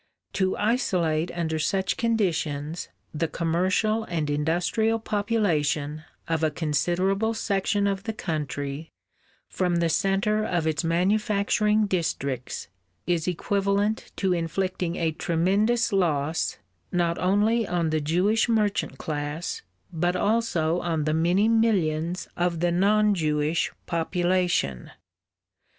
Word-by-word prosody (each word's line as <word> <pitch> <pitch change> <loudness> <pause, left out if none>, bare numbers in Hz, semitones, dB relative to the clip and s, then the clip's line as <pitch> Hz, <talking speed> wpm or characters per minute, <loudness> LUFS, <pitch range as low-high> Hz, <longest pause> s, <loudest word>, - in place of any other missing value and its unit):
To 190 -1 0
isolate 180 - +1
under 160 -2 -2
such 190 +4 0
conditions, 165 -9 -1 0.2
the 160 +2 -1
commercial 185 +7 0
and 155 -4 -2
industrial 175 +9 +1
population 165 -9 0 0.2
of 165 -1 -1
a 155 - +4
considerable 175 +8 0
section 200 -1 0
of 195 0 -1
the 220 - -2
country 145 -4 -4 0.6
from 180 -2 0
the 170 -1 +2
centre 195 +4 +1
of 175 -6 -1
its 160 +1 0
manufacturing 210 +4 +2
districts 140 - -2 0.4
is 175 -2 0
equivalent 200 +4 0
to 190 -2 +1
inflicting 175 +1 -2
a 165 -2 0
tremendous 200 +9 +1
loss 160 -4 0 0.3
not 170 -2 0
only 210 +4 +2
on 170 -2 0
the 155 -1 +1
Jewish 185 +10 +2
merchant 210 -3 0
class 150 +1 -4 0.3
but 175 +2 0
also 180 -6 +1
on 165 -3 -1
the 155 +1 0
many 175 +6 +3
millions 180 -7 +1
of 175 -1 0
the 175 +1 +1
non 210 +4 +3
Jewish 155 -2 0
population.... 175 - 0
175 Hz, 115 wpm, -25 LUFS, 160-205 Hz, 0.6 s, a